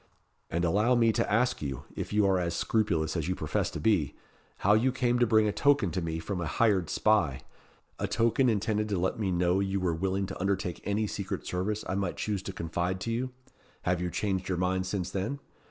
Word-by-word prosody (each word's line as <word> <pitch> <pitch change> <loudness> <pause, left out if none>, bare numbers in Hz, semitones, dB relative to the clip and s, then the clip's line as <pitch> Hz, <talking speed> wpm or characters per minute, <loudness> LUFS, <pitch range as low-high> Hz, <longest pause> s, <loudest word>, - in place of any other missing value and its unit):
And 85 +1 0
allow 105 +9 +3
me 115 -1 +4
to 115 0 -1
ask 125 +3 +2
you, 70 -2 -4
if - - -4
you 105 0 +3
are 95 -1 +3
as 85 -1 -1
scrupulous 85 -8 0
as 80 -3 -1
you 90 - 0
profess 75 -3 -1
to - - -6
be, 95 - +1 0.5
how 105 - +6
you 120 +5 +3
came 125 -1 +1
to 120 - +4
bring 110 -1 +4
a - - +1
token 140 -7 +3
to 90 - -2
me 80 -1 -2
from 90 +3 -4
a 85 - -2
hired 95 -1 +2
spy 80 -12 +2 0.6
a - - -1
token 115 +3 +2
intended 105 0 0
to 100 - 0
let 95 +5 -1
me 100 -4 0
know 90 +1 +2
you 100 0 0
were 90 -2 0
willing 95 +3 -1
to 95 -1 -7
undertake 95 -2 -1
any 105 +2 0
secret 100 -1 -4
service 100 +4 -2
I - - -2
might 95 -2 -2
choose 105 -3 -2
to 95 - -5
confide 85 +1 -2
to 115 - -2
you? 125 +3 -1 0.5
Have 90 -1 0
you 90 - -1
changed 95 0 -2
your 90 - 0
mind 90 +1 0
since 90 -2 -2
then? 100 +9 -2
95 Hz, 220 wpm, -29 LUFS, 90-110 Hz, 0.6 s, how